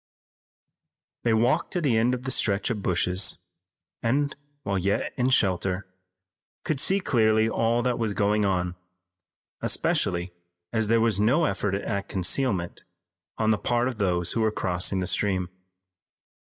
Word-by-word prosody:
They 115 - +1
walked 125 +9 +1
to 180 - 0
the 140 -8 +1
end 120 +3 +2
of 125 - -8
the 130 - -2
stretch 105 -1 +1
of 105 -3 -3
bushes, 90 +1 +1 0.6
and, 140 +5 0 0.3
while 100 -2 -1
yet 100 +3 -1
in 125 +1 +1
shelter, 95 -5 +1 0.8
could 155 -4 -2
see 195 +7 +3
clearly 110 - +2
all 115 +1 +1
that 125 -1 0
was 110 -3 -1
going 105 +1 +1
on, 90 -3 0 0.9
especially 85 0 0 0.4
as 110 -2 +1
there 115 +1 +3
was 110 -4 +2
no 130 +11 +3
effort 100 0 -1
at 100 0 -3
concealment 95 -1 -1 0.5
on 110 0 +2
the 105 - +1
part 120 0 0
of 125 -4 -5
those 90 -3 +1
who 115 - -1
were 110 -1 +2
crossing 95 -1 0
the - - -1
stream. 95 -1 0
105 Hz, 150 wpm, -26 LUFS, 95-120 Hz, 0.9 s, see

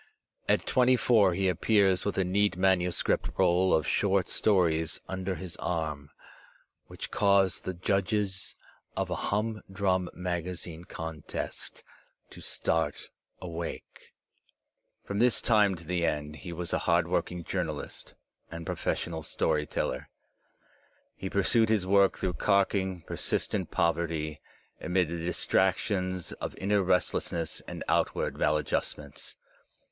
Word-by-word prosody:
At - - +3
twenty 130 0 +4
four 105 -7 +4
he 95 +1 +1
appears 95 +1 +3
with 100 - -1
a 95 - +3
neat 100 +1 +1
manuscript 90 -2 +2
roll 90 +2 +4
of 80 - +3
short 100 -3 +2
stories 85 -6 +2
under 95 0 -3
his 90 -2 -6
arm, 75 -4 -3 0.8
which - - -7
cause 100 -3 +3
the 95 - -4
judges 95 +1 -1 0.4
of - - -1
a - - +1
humdrum 100 -4 0
magazine 90 -1 -4
contest 80 -3 -6 0.5
to - - -11
start 80 0 -1 0.3
awake. 85 -1 -7 0.9
From 100 0 -3
this 125 +1 +4
time 105 -4 +4
to 85 -1 -11
the 85 +1 -1
end 75 -2 -1
he 90 - -8
was 85 0 -4
a - - +2
hard 85 0 +4
working 90 0 -1
jour 90 +2 -1
nalist 75 -2 -7 0.3
and 85 0 -7
professional 80 0 -2
story 75 0 0
teller. 65 - -2 1.1
He 95 - -5
pursued 110 +4 +3
his 105 -4 +2
work 100 0 +4
through 90 -1 -1
carking, 95 -2 +1
persistent - - -2
poverty, 80 -2 0 0.4
amid 90 -2 +1
the 85 0 -3
distractions 95 0 0
of - - -6
inner 100 +1 +2
restlessness 85 -3 0
and - - -5
outward - - +1
maladjustments. 75 -1 -1
90 Hz, 125 wpm, -29 LUFS, 85-100 Hz, 1.1 s, twenty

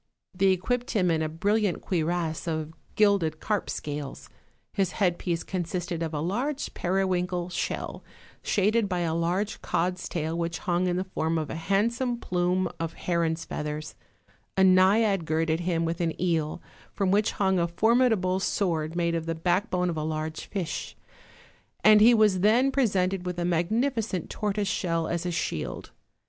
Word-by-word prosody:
They 195 +1 +2
equipped 240 +7 0
him 185 -6 +2
in 160 -1 +1
a 155 - -1
brilliant 200 +4 0
cuirass 170 -1 -1
of 160 -1 -3 0.2
gilded 195 -7 +3
carp 210 -2 -1
scales; 145 -2 -5 0.4
his 190 -3 0
headpiece 175 -3 0
consisted 175 -2 -3
of 165 -2 -2
a 150 - -3
large 250 - -2
periwinkle 180 -1 0
shell, - - -3 0.4
shaded 210 +1 +1
by 180 -2 -1
a 165 -2 0
large 180 +6 -1
cod's 180 +2 -1
tail 160 -1 -2
which 170 0 -2
hung 175 +1 0
in 175 - 0
the 185 - 0
form 165 -3 -1
of 155 -2 -3
a - - -4
handsome 230 +8 0
plume 180 -2 0
of 165 0 -3
heron's 165 -2 -1
feathers; 150 +1 -5 0.6
a 190 - +5
naiad 190 +1 +4
girded 160 +1 0
him 170 -1 0
with 165 +1 -2
an 165 -2 -1
eel, 165 -3 -1 0.3
from 195 -2 0
which 210 +2 +2
hung 190 -2 +1
a 170 - +2
formidable 215 -1 +2
sword 165 -5 -1
made 170 -1 +1
of 165 -1 -2
the 165 - -1
backbone 180 +2 0
of 165 - -5
a 155 - -2
large 155 0 -4
fish; 185 -6 -4 0.9
and 215 0 +7
he 235 +2 +7
was 210 -4 +4
then 235 +8 +4
presented 195 -8 +1
with 180 -1 -3
a 175 - -1
magnificent 210 - 0
tortoise 210 -1 -1
shell 165 -5 0
as 170 +1 -2
a - - -1
shield. 165 - -3
180 Hz, 160 wpm, -27 LUFS, 165-200 Hz, 0.9 s, and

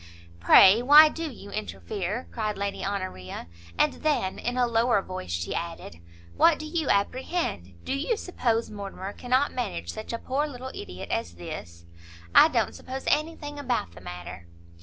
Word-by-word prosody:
"Pray 190 - +7
why 295 +4 +9
do 325 +1 -4
you 210 -6 -11
interfere?" 210 +1 -4
cried 215 -2 -2
Lady 200 0 -3
Honoria, 185 - -4 0.3
and - - +3
then, 290 -11 0
in 245 +1 -3
a 250 - +4
lower 235 -1 +2
voice, 185 - -7
she 85 0 -2
added, 165 - -5 0.4
"what 330 -2 +5
do 310 - -7
you 315 -1 -2
apprehend? 200 - -1
do - - -2
you 305 - 0
suppose 235 - -1
Mortimer 200 -1 -6
cannot 255 +3 +1
manage 85 - -3
such 215 - -7
a 230 - -2
poor 275 +5 -1
little 260 -2 -7
ideot 90 +1 -8
as 85 -6 -2
this?" 85 0 -8 0.5
"I - - +9
don't - - 0
suppose 265 +1 -7
any 320 +2 +1
thing 290 -1 -8
about 245 - -1
the 90 +1 -14
matter!" 90 -1 -8
220 Hz, 165 wpm, -27 LUFS, 165-270 Hz, 0.5 s, why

